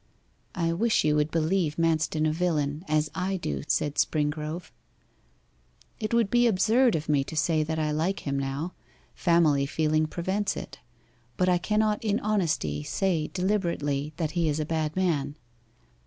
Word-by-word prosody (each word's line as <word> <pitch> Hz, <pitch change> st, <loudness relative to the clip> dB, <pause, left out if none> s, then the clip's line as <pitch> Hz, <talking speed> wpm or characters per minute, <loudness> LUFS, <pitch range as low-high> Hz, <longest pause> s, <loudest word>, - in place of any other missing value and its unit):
'I 165 Hz, -2 st, 0 dB
wish 220 Hz, +6 st, +2 dB
you 150 Hz, -1 st, +2 dB
would 150 Hz, 0 st, +2 dB
believe 165 Hz, 0 st, 0 dB
Manston 160 Hz, -1 st, +1 dB
a -, -, +1 dB
villain, 155 Hz, -3 st, -1 dB
as 155 Hz, 0 st, +1 dB
I 190 Hz, +1 st, -1 dB
do,' 70 Hz, -, -3 dB
said 145 Hz, 0 st, 0 dB
Springrove. 155 Hz, +2 st, -1 dB, 1.3 s
'It 215 Hz, -2 st, -3 dB
would 230 Hz, -4 st, +2 dB
be 240 Hz, 0 st, +4 dB
absurd 225 Hz, +3 st, +3 dB
of 155 Hz, -1 st, -3 dB
me 145 Hz, -2 st, +2 dB
to 160 Hz, -, -8 dB
say 160 Hz, 0 st, +2 dB
that 160 Hz, +1 st, -2 dB
I 155 Hz, -1 st, 0 dB
like 165 Hz, +6 st, -1 dB
him 140 Hz, -1 st, -2 dB
now 140 Hz, +6 st, -3 dB, 0.4 s
family 155 Hz, -5 st, +3 dB
feeling 155 Hz, +1 st, +1 dB
prevents 190 Hz, +5 st, -2 dB
it, 135 Hz, -, -8 dB, 0.6 s
but 180 Hz, -, +2 dB
I 180 Hz, -1 st, +3 dB
cannot 210 Hz, +3 st, 0 dB
in 210 Hz, -1 st, +1 dB
honesty 160 Hz, -, 0 dB
say 165 Hz, -, 0 dB
deliberately 170 Hz, -7 st, -1 dB
that 160 Hz, -3 st, -1 dB
he 170 Hz, -1 st, +1 dB
is 150 Hz, +1 st, -1 dB
a 155 Hz, -, -1 dB
bad 155 Hz, -1 st, -2 dB
man. 150 Hz, -6 st, 0 dB
160 Hz, 160 wpm, -27 LUFS, 150-185 Hz, 1.3 s, be